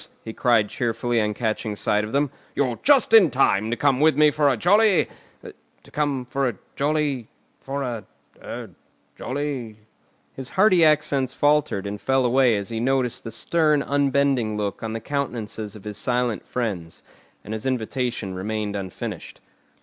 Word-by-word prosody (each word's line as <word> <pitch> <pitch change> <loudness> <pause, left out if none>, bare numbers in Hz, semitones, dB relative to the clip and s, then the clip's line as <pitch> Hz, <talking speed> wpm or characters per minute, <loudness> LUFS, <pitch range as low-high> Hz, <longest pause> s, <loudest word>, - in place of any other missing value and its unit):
he 110 - -7
cried 115 -4 +3
cheerfully 120 +1 -1
on 105 0 0
catching 110 -1 -2
sight 105 +1 +1
of 105 - -5
them. 140 +1 +1 0.2
"You're 125 -4 0
just 270 -5 +4
in 210 -7 +8
time 110 -6 +2
to 120 - -1
come 140 -3 +2
with 155 -1 +4
me 150 0 +6
for 145 -1 +2
a 130 - +1
jolly—to 205 - 0
come 145 -4 -1
for 135 +1 0
a 115 - -6 0.2
jolly—for 140 -1 -3
a—er—jolly——" 115 - -7 0.6
His 135 -1 -7
hearty 190 -3 +4
accents 145 -4 +2
faltered 145 -9 +2
and 100 +1 -5
fell 135 -1 +2
away 125 -1 +4
as 100 -1 -3
he 115 -1 -3
noticed 125 0 0
the 115 - -6
stern 150 +5 +1
unbending 140 -5 +1
look 100 -2 -3
on 110 -1 -4
the 115 - -3
countenances 115 -5 -4
of 105 - -12
his 105 -1 -6
silent 125 -2 -1
friends, 95 -10 -4 0.4
and 110 - -6
his 110 +4 -4
invitation 120 -4 -2
remained 105 +2 -3
unfinished. 95 -2 -6
125 Hz, 150 wpm, -23 LUFS, 110-140 Hz, 0.6 s, in